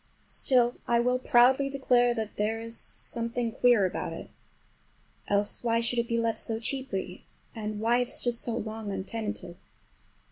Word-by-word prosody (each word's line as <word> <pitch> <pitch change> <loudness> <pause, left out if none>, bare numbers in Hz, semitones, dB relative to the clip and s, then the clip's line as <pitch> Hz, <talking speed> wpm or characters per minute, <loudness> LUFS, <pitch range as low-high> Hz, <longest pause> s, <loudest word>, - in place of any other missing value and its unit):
Still 245 -2 +2
I 235 0 +3
will 250 +1 +1
proudly 255 +3 +4
declare 245 -3 +2
that 220 -2 -4
there 215 +2 -1
is 230 0 -7
something 235 0 -3
queer 240 -4 +4
about 185 - -3
it. - - -9 1.0
Else, 205 +2 0
why 230 -1 +2
should 235 +1 0
it 235 - -1
be 235 - 0
let 230 -1 0
so 225 -1 -2
cheaply? 225 -7 -3 0.3
And 215 -1 -4
why 235 +3 +2
have 245 - -1
stood 240 -1 +1
so 235 0 0
long 220 -2 -5
untenanted? 200 -2 -5
230 Hz, 155 wpm, -28 LUFS, 220-245 Hz, 1.0 s, proudly